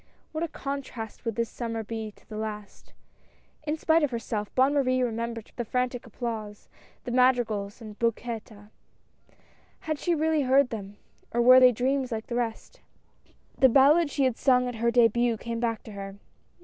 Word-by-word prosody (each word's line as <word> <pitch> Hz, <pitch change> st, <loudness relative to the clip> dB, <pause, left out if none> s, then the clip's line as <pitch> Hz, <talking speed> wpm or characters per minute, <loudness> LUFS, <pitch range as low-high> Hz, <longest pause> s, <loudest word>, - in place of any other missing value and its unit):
What 315 Hz, +1 st, -3 dB
a -, -, 0 dB
contrast 275 Hz, -7 st, -6 dB
would 230 Hz, -2 st, -2 dB
this 230 Hz, -1 st, -2 dB
summer 230 Hz, -2 st, -4 dB
be 220 Hz, 0 st, -5 dB
to -, -, -25 dB
the 215 Hz, -, -9 dB
last. 215 Hz, -1 st, -7 dB, 0.8 s
In 300 Hz, +2 st, 0 dB
spite 320 Hz, +1 st, +3 dB
of 295 Hz, -, +2 dB
herself, 225 Hz, -3 st, -3 dB
Bonne 265 Hz, +2 st, +4 dB
Marie 255 Hz, -3 st, +2 dB
remem 235 Hz, -1 st, -2 dB
bered 225 Hz, -2 st, -10 dB
the 240 Hz, -, -1 dB
frantic 250 Hz, +1 st, -2 dB
applause, 220 Hz, -2 st, -6 dB, 0.4 s
the 245 Hz, -, -5 dB
madrigals, 240 Hz, -5 st, +1 dB
and 215 Hz, -2 st, -10 dB
bouquets. 230 Hz, -1 st, -2 dB, 1.3 s
Had 310 Hz, -2 st, -3 dB
she 350 Hz, -2 st, +1 dB
really 315 Hz, 0 st, +1 dB
heard 265 Hz, 0 st, +3 dB
them, 205 Hz, -2 st, -7 dB, 0.3 s
or 240 Hz, -, -1 dB
were 255 Hz, +1 st, +9 dB
they 255 Hz, -1 st, +7 dB
dreams 260 Hz, +2 st, -1 dB
like 220 Hz, -1 st, -3 dB
the 235 Hz, -, -5 dB
rest. 240 Hz, -, -4 dB, 0.7 s
The 265 Hz, -, +5 dB
ballad 285 Hz, +6 st, +5 dB
she 285 Hz, -, 0 dB
had 255 Hz, -3 st, +1 dB
sung 250 Hz, -2 st, +3 dB
at 245 Hz, -, -3 dB
her 235 Hz, +1 st, +1 dB
debut 235 Hz, 0 st, +3 dB
came 230 Hz, +1 st, -5 dB
back 230 Hz, -2 st, -2 dB
to 220 Hz, -, -10 dB
her. 195 Hz, -1 st, -7 dB
240 Hz, 175 wpm, -27 LUFS, 225-260 Hz, 1.3 s, were